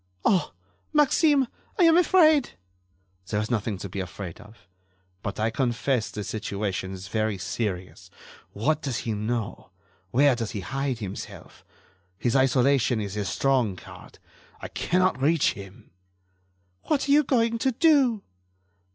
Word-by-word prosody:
"Oh! 185 -4 +2 0.4
Maxime, 295 -2 +4 0.3
I 370 - +4
am 330 -1 +6
afraid." 315 -6 +4 0.7
"There 105 - -1
is 110 +3 -3
nothing 110 -3 -1
to 100 - -6
be 95 +1 -6
afraid 95 +1 -7
of, 105 -3 -17 0.5
but 100 - -5
I 110 +1 +1
confess 120 0 0
the 105 - -5
situation 100 -4 -3
is 95 0 -8
very 110 0 -1
serious. 95 -1 -4 0.4
What 150 +9 0
does 135 -5 -2
he 115 - -1
know? 110 +1 -3 0.4
Where 135 +4 +4
does 115 -3 -3
he - - -3
hide 135 +3 -2
himself? 100 -4 -8 0.5
His 120 +4 0
isolation 130 -2 +3
is 100 -2 -4
his 100 -2 -2
strong 130 -8 +1
card. - - -13 0.4
I - - -7
cannot 180 -6 0
reach 155 +2 +3
him." 100 +3 -12 0.9
"What 290 -2 0
are - - +1
you 295 +1 +6
going 230 -4 +1
to 265 - +1
do?" 260 -6 +3
120 Hz, 145 wpm, -26 LUFS, -, 0.9 s, am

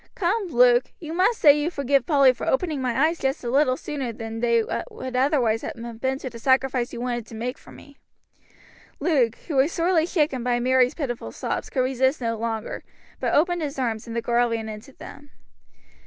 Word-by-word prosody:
Come, 390 +2 0
Luke, 245 -4 +4
you 320 -2 -7
must 380 +6 +2
say 290 -3 +8
you 295 +3 0
forgive 280 -4 0
Polly 275 -5 +5
for 235 - -6
opening 300 -1 0
my 255 +3 +2
eyes 330 +1 -1
just 270 0 -1
a 240 - -2
little 260 -1 +3
sooner 275 -5 -4
than 225 0 -6
they 235 -1 +2 0.3
would 260 -1 -7
otherwise 250 -4 +2
have 230 -1 -7
been 265 0 0
to 270 - -7
the 235 -2 -8
sacrifice 260 0 +1
you - - -7
wanted 240 -2 -3
to 225 - -10
make 245 +3 -3
for - - -16
me." 285 -1 -15 1.0
Luke, 275 -7 +2
who 300 -5 -2
was 275 +5 +3
sorely 335 -1 +1
shaken 295 -9 0
by 245 -1 +1
Mary's 255 +2 +3
pitiful 255 -7 -4
sobs, - - -4
could 260 - 0
resist 260 +2 +1
no 230 -2 -1
longer, 225 -1 -4 0.4
but - - 0
opened 350 +3 +2
his 290 -2 -4
arms, 230 -4 -2
and 230 - -6
the 235 - -2
girl 240 0 +2
ran 225 -1 -3
into 215 +5 -9
them. 290 +2 -12
260 Hz, 200 wpm, -24 LUFS, 235-295 Hz, 1.0 s, say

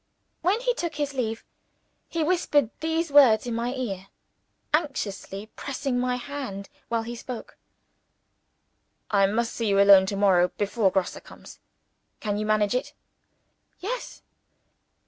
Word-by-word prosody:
When 375 +6 +2
he - - +1
took 340 -9 -4
his 290 -1 -2
leave, 225 -4 -3 0.6
he 330 -1 -1
whispered 300 -7 +2
these 320 0 -1
words 255 -7 +6
in 240 - -3
my 235 +2 -1
ear; 195 -7 -4 0.7
anxiously 215 - -2
pressing 270 -2 -2
my 250 0 0
hand 250 -7 -6 0.2
while 230 -1 0
he 235 +1 -6
spoke: 240 0 -8 1.6
"I 200 -2 +4
must 230 +3 -1
see 230 - -2
you 200 -1 +3
alone 200 -1 +7
to 200 - -2
morrow, 190 -3 +4
before 205 0 +2
Grosse 190 -1 -1
comes. - - -14 0.6
Can 205 -2 -2
you 215 - -2
manage 210 -1 +2
it?" 250 - -2 0.9
"Yes." 480 +7 -5
235 Hz, 135 wpm, -26 LUFS, 205-285 Hz, 1.6 s, alone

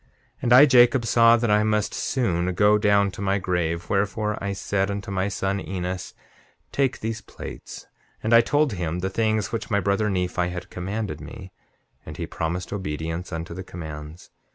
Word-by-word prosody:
7:27 - - -36 0.3
And 120 - +3
I, 130 +4 +10
Jacob, 125 -2 +5
saw 115 0 +5
that 115 -2 0
I 105 0 +4
must 105 -1 0
soon 90 -9 0
go 105 +2 +4
down 100 -1 +3
to 95 - -9
my 100 0 +1
grave; 85 -3 -1
wherefore, 105 +2 0
I 100 - -1
said 100 0 -1
unto 100 0 -4
my 95 0 0
son 100 0 -1
Enos: 90 -1 -5 0.6
Take 135 -2 0
these 110 0 -3
plates. - - -9 0.4
And 110 +2 +1
I 115 - +9
told 145 +2 +1
him 90 -1 -3
the 95 +1 -2
things 110 0 0
which 115 - -4
my 100 -3 +2
brother 100 +2 +1
Nephi 90 -2 -1
had 90 0 -7
commanded 100 +4 -4
me, 100 -6 -10 0.5
and - - -9
he - - -3
promised 85 +3 -4
obedience 80 -1 -4
unto 80 0 -5
the 95 +2 -6
commands. 80 -1 -9
100 Hz, 180 wpm, -24 LUFS, 90-110 Hz, 0.6 s, I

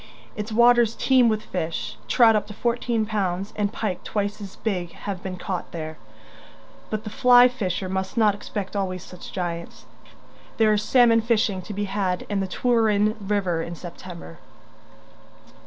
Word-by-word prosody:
Its 210 +1 -5
waters 235 0 +5
teem 255 -3 +4
with 215 -1 -1
fish; 160 -10 -4
trout 225 - +5
up 210 -1 0
to 210 - -9
fourteen 235 -1 0
pounds 195 -2 -2
and 205 -1 0
pike 205 -5 -3
twice 210 0 -2
as 195 -1 -8
big 180 -6 -3
have 195 -3 -6
been 185 -2 -5
caught 180 0 -4
there 155 -1 -5 0.9
but 215 -1 -3
the 215 - -5
flyfisher 245 -6 +4
must 190 +3 -3
not 215 -3 +4
expect 200 0 -6
always 185 -2 -2
such 180 -1 -11
giants. 170 -2 -5 0.7
There 220 -1 +4
is 210 - +1
salmon 235 -1 +5
fishing 215 -4 +1
to 210 - -8
be 205 - -1
had 190 -2 -1
in 205 -1 0
the 195 - -1
Treweryn 215 -1 +2
river 195 -4 0
in 170 +1 -5
September. 170 - -10
205 Hz, 155 wpm, -24 LUFS, 185-220 Hz, 0.9 s, waters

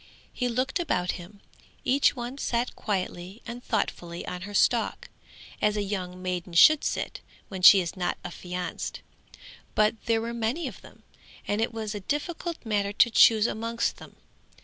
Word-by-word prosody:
He 250 -1 -1
looked 255 +8 -1
about 180 - 0
him. 200 +3 -14 0.4
Each 270 +2 +3
one 245 +2 -6
sat 240 -1 -1
quietly 190 0 -4
and 240 +1 -7
thoughtfully 170 0 -2
on 180 0 -5
her - - -9
stalk, - - +1 0.5
as 210 0 +2
a 205 - 0
young 185 -3 -4
maiden 180 -1 -3
should 300 - +7
sit, - - -2 0.3
when 190 -2 -6
she 190 +1 +9
is 170 +1 -5
not 180 -2 -1
affianced; 180 +1 -5 0.7
but 215 +1 +4
there 230 -2 +2
were 230 +1 -4
many 235 +8 -1
of - - -9
them, - - -17 0.4
and 205 +2 0
it 225 - 0
was 220 -2 -4
a 205 - -4
difficult 325 - -3
matter 205 -2 0
to 235 +3 +4
choose 220 -1 +6
amongst 230 +1 -1
them. - - -13
215 Hz, 165 wpm, -27 LUFS, 185-240 Hz, 0.7 s, she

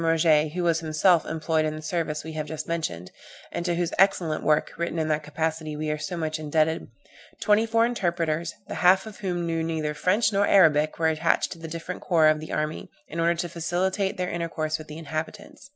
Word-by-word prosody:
Roget, 155 -2 +3
who 180 0 -2
was 165 -1 +2
himself 165 +2 +3
employed 160 0 0
in 155 0 -2
the 155 - -7
service 155 -2 -2
we 160 - -7
have 155 -1 -4
just 155 -1 -5
mentioned, 90 - -3 0.4
and 170 - -3
to 175 - +1
whose 175 -1 -1
excellent 180 -5 +2
work, 150 -1 +2
written 170 +1 -3
in 160 -1 0
that 155 0 +1
capacity, 155 +1 -3
we 155 0 -2
are 150 - -3
so 175 +3 -4
much 155 -1 -2
indebted, 155 +1 0 0.5
"twenty 215 +1 +3
four 230 +1 +3
interpreters, 170 -7 -1
the - - -5
half 185 +3 +5
of 215 -2 -10
whom 175 -3 -2
knew 165 -1 -1
neither 160 -2 -2
French 205 +8 +2
nor 200 +1 +3
Arabic, 155 -5 +4
were 165 - 0
attached 160 +1 +1
to 170 - -8
the 165 - -7
different 165 +3 -6
corps 160 -3 +4
of 155 0 +2
the 155 - -8
army, 155 +1 -3 0.2
in 165 - -5
order 170 +1 +3
to 175 +1 -2
facilitate 180 +4 -1
their 180 0 -2
intercourse 160 -2 -2
with 155 - -10
the 150 - -8
inhabitants." 165 - -6
165 Hz, 215 wpm, -26 LUFS, 155-175 Hz, 0.5 s, half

